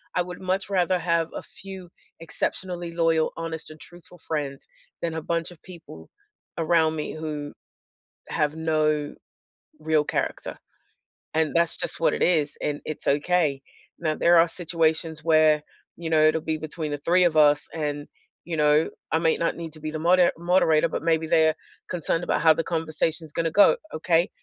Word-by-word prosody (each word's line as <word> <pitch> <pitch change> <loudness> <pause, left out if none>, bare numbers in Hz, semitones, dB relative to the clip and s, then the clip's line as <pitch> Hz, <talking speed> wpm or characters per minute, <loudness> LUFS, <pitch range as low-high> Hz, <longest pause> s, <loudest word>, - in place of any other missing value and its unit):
I 180 - +2
would 180 0 -9
much 190 +1 -2
rather 185 -1 +1
have 170 -1 0
a - - -4
few, 190 -2 -9 0.3
exceptionally 175 +1 -3
loyal, 165 -1 +1
honest 165 -1 -5
and 155 0 -12
truthful 175 0 -15
friends, 145 -4 -4 0.3
than 170 -1 -2
a 160 - -3
bunch 165 +2 -2
of 165 - -16
people 165 -4 -12 0.5
around 160 -1 +2
me 150 - -4
who 150 -2 -5 0.8
have 150 +1 -1
no 155 -2 0 0.7
real 155 -1 +2
character, - - -3 0.7
and 155 -1 +1
that's 170 -1 +2
just - - -3
what 165 - +2
it - - 0
is, 155 -4 +2
and 145 -1 -2
it's 155 - -5
okay. 150 -1 +1 0.4
Now 155 -2 -1
there 170 0 +4
are 165 - +6
situations 160 -2 0
where, 155 -2 +4 0.3
you 165 -1 -5
know, 155 -1 +3
it'll 160 +1 +1
be 160 0 -2
between 155 0 -5
the 145 - -2
3 180 +2 +4
of 165 -3 +2
us 150 -1 +4
and, 145 -2 -3 0.4
you 170 -2 -4
know, 150 +1 +3 0.2
I 160 - +2
might 165 -1 +1
not 170 - 0
need 165 -2 -7
to 155 - -8
be 155 0 -5
the 155 - -4
moder 175 +2 +4
moderator, 170 -2 +3
but - - -4
maybe 160 -1 +1
they're 160 -1 +4 0.4
concerned 170 -1 -1
about - - 0
how 160 -1 +6
the 165 - -2
conversation's 160 -1 -2
gonna 165 0 -1
go, 205 - +6 0.2
"Okay? 165 +3 +1
160 Hz, 175 wpm, -25 LUFS, 155-170 Hz, 0.8 s, are